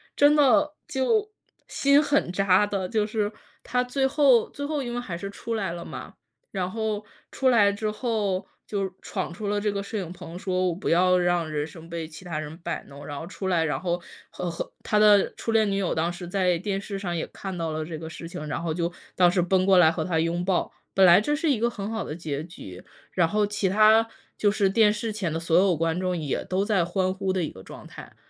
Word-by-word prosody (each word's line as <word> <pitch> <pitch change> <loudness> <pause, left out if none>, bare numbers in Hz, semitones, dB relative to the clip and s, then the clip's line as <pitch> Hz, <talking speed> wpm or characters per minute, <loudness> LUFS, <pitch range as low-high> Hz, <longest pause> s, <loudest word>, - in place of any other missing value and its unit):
真 290 +1 +5
的 295 +2 +4
就 420 - +1 0.4
心 280 +1 +4
很 290 -10 +1
扎 195 +1 +3
的。 195 -3 -2
就 215 -1 +1
是 210 -1 -1 0.3
他 250 0 0
最 265 +2 0
后 265 -5 +4
最 285 - -6
后 295 -1 -2
因 240 -2 -4
为 245 - -2
还 185 -8 -5
是 195 +3 -5
出 230 +3 -5
来 195 -6 -2
了 170 - -6
嘛， - - -8 0.4
然 185 -2 -2
后 220 -1 -2 0.3
出 265 -1 +2
来 205 -4 +5
之 215 +1 -2
后 210 -5 -1 0.2
就 195 -3 -2
闯 190 -4 -4
出 205 +3 -5
了 205 0 0
这 210 - +1
个 200 0 -3
摄 215 +2 -5
影 180 -3 -4
棚， 175 -1 -9
说 185 -1 0
“我 170 - -2
不 190 - -3
要 180 +2 +4
让 175 -2 +1
人 150 -1 -1
生 165 0 -12
被 165 -2 -4
其 155 +3 -12
他 165 -3 -3
人 155 0 -6
摆 170 -1 -4
弄“， 140 +1 -11
然 145 -1 -5
后 - - -6
出 190 +1 -5
来， 175 -3 +2
然 150 - -1
后 175 -1 -1 0.3
和 180 - -5
和 170 - -5
他 210 - +2
的 210 -2 +5
初 230 - -3
恋 220 -2 +3
女 195 - 0
友 195 -3 0
当 165 +2 0
时 175 0 -8
在 180 -1 +1
电 195 +1 -2
视 195 0 -5
上 175 -3 -3
也 160 - -2
看 190 -2 -7
到 165 -1 -2
了 155 0 -2
这 160 -1 -6
个 160 - -7
事 165 +1 -8
情， 175 -4 -6
然 165 - -3
后 165 - -1
就 170 0 -1 0.2
当 180 -1 +5
时 180 0 +2
奔 185 +1 +2
过 190 -1 +5
来 160 -3 +6
和 160 - -2
他 165 -1 0
拥 170 +2 0
抱， 185 -2 0 0.2
本 195 - +4
来 175 0 +8
这 295 +7 0
是 315 +1 0
一 250 - +1
个 235 - +2
很 205 -3 -5
好 220 -3 -2
的 150 - -6
结 155 -3 -4
局， 95 - -11 0.3
然 175 -3 +2
后 210 +4 +1
其 210 -1 -1
他 215 +3 +5 0.3
就 205 - +3
是 200 -2 +2
电 210 +1 +4
视 220 +1 -3
前 190 -7 -2
的 165 - -1
所 165 0 +2
有 185 -1 +4
观 165 +2 0
众， 185 -1 -1
也 150 -4 -2
都 185 +1 0
在 200 -6 +2
欢 185 0 0
呼 190 0 -2
的 185 -2 0
一 155 - -2
个 95 - -13
状 - - -11
态。 - - -12
190 Hz, 265 characters per minute, -26 LUFS, 170-215 Hz, 0.4 s, 来